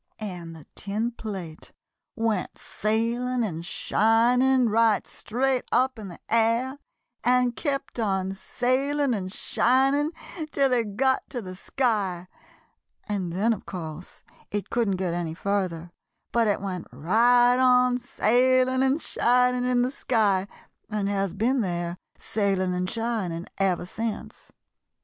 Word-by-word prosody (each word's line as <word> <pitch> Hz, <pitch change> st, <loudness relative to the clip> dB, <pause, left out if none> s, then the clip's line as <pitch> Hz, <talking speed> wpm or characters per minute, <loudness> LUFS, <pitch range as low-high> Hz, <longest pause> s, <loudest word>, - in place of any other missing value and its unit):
"And 175 Hz, -6 st, -6 dB
the 155 Hz, -3 st, -13 dB
tin 215 Hz, +4 st, -2 dB
plate 190 Hz, -9 st, -7 dB, 0.4 s
went 225 Hz, -4 st, -1 dB
sailing 235 Hz, +3 st, -1 dB
and 165 Hz, -6 st, -3 dB
shining 240 Hz, +7 st, +3 dB
right 220 Hz, -2 st, +3 dB
straight 255 Hz, +3 st, -1 dB
up 255 Hz, -1 st, +2 dB
in 210 Hz, -, -7 dB
the 175 Hz, -, -10 dB
air, 230 Hz, +4 st, +1 dB, 0.4 s
and 250 Hz, -1 st, +3 dB
kept 275 Hz, -5 st, -3 dB
on 190 Hz, -3 st, 0 dB
sailing 265 Hz, +6 st, 0 dB
and 185 Hz, -4 st, -3 dB
shining 270 Hz, +8 st, +2 dB, 0.4 s
till 275 Hz, -3 st, +2 dB
it 220 Hz, -5 st, -1 dB
got 265 Hz, 0 st, +1 dB
to 255 Hz, -, -4 dB
the 185 Hz, -4 st, -7 dB
sky; 195 Hz, -6 st, -1 dB, 0.8 s
and 195 Hz, -5 st, -2 dB
then, 210 Hz, +7 st, +2 dB
of 210 Hz, -, -9 dB
course, 170 Hz, -2 st, -8 dB, 0.3 s
it 205 Hz, -1 st, -4 dB
couldn't 225 Hz, -5 st, +1 dB
get 185 Hz, -2 st, -2 dB
any 170 Hz, -2 st, -3 dB
further, 180 Hz, -3 st, -2 dB, 0.4 s
but 235 Hz, -1 st, +2 dB
it 205 Hz, -, +1 dB
went 185 Hz, -3 st, -4 dB
right 240 Hz, -, +4 dB
on 250 Hz, -1 st, +4 dB
sailing 255 Hz, +2 st, +2 dB
and 265 Hz, +4 st, +1 dB
shining 250 Hz, +1 st, +2 dB
in 245 Hz, -1 st, +3 dB
the 255 Hz, -, -1 dB
sky, 205 Hz, -8 st, +1 dB, 0.4 s
and 210 Hz, -2 st, -1 dB
has 195 Hz, -2 st, -1 dB
been 245 Hz, +5 st, +1 dB
there, 175 Hz, -3 st, -2 dB, 0.2 s
sailing 195 Hz, -3 st, 0 dB
and 180 Hz, 0 st, -1 dB
shining, 220 Hz, -7 st, -2 dB
ever 185 Hz, -2 st, +1 dB
since. 220 Hz, +4 st, -5 dB
225 Hz, 130 wpm, -26 LUFS, 190-250 Hz, 0.8 s, right